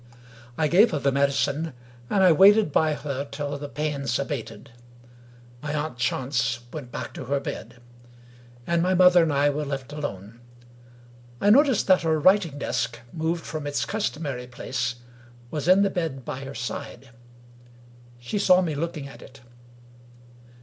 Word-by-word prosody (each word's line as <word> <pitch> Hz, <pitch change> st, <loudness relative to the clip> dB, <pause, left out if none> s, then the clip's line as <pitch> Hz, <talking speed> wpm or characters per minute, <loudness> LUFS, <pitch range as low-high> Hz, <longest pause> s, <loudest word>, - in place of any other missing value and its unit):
I 155 Hz, -, +2 dB
gave 195 Hz, +9 st, +5 dB
her 155 Hz, -, -2 dB
the 140 Hz, 0 st, +1 dB
medicine; 140 Hz, +3 st, 0 dB, 0.4 s
and 195 Hz, -2 st, +2 dB
I 185 Hz, -, +7 dB
waited 200 Hz, +2 st, +6 dB
by 155 Hz, +1 st, +2 dB
her 140 Hz, -2 st, -4 dB
till 145 Hz, 0 st, -4 dB
the 145 Hz, 0 st, -6 dB
pains 140 Hz, -4 st, -2 dB
abated. 140 Hz, -4 st, -5 dB, 0.9 s
My 150 Hz, 0 st, -3 dB
aunt 150 Hz, -5 st, -3 dB
Chance 120 Hz, -2 st, -1 dB
went 140 Hz, -6 st, -7 dB
back -, -, -6 dB
to 130 Hz, -, -7 dB
her 140 Hz, +3 st, 0 dB
bed; 120 Hz, -3 st, -7 dB, 0.9 s
and 170 Hz, 0 st, +1 dB
my 185 Hz, +2 st, +2 dB
mother 180 Hz, -1 st, +6 dB
and 165 Hz, -2 st, +1 dB
I 145 Hz, +1 st, +3 dB
were 150 Hz, +1 st, -3 dB
left 140 Hz, -1 st, -5 dB
alone. 115 Hz, -7 st, -6 dB, 1.0 s
I 205 Hz, -, +4 dB
noticed 270 Hz, -1 st, +4 dB
that 185 Hz, -1 st, +4 dB
her 160 Hz, -1 st, +1 dB
writing 180 Hz, -3 st, +3 dB
desk, -, -, -2 dB, 0.2 s
moved 165 Hz, +1 st, -2 dB
from 155 Hz, -2 st, -5 dB
its 145 Hz, -, -1 dB
customary 150 Hz, -, -3 dB
place, 125 Hz, 0 st, -3 dB, 0.6 s
was 150 Hz, +2 st, -2 dB
on 190 Hz, +2 st, +6 dB
the 200 Hz, -, +1 dB
bed 160 Hz, -8 st, -3 dB
by 135 Hz, +1 st, -5 dB
her 135 Hz, -, -8 dB
side. 125 Hz, +2 st, -6 dB, 1.1 s
She 120 Hz, -, -4 dB
saw 185 Hz, -1 st, +5 dB
me 165 Hz, -3 st, -2 dB
looking 155 Hz, -1 st, -4 dB
at 140 Hz, -, -13 dB
it. 135 Hz, 0 st, -14 dB
145 Hz, 155 wpm, -25 LUFS, 135-170 Hz, 1.1 s, I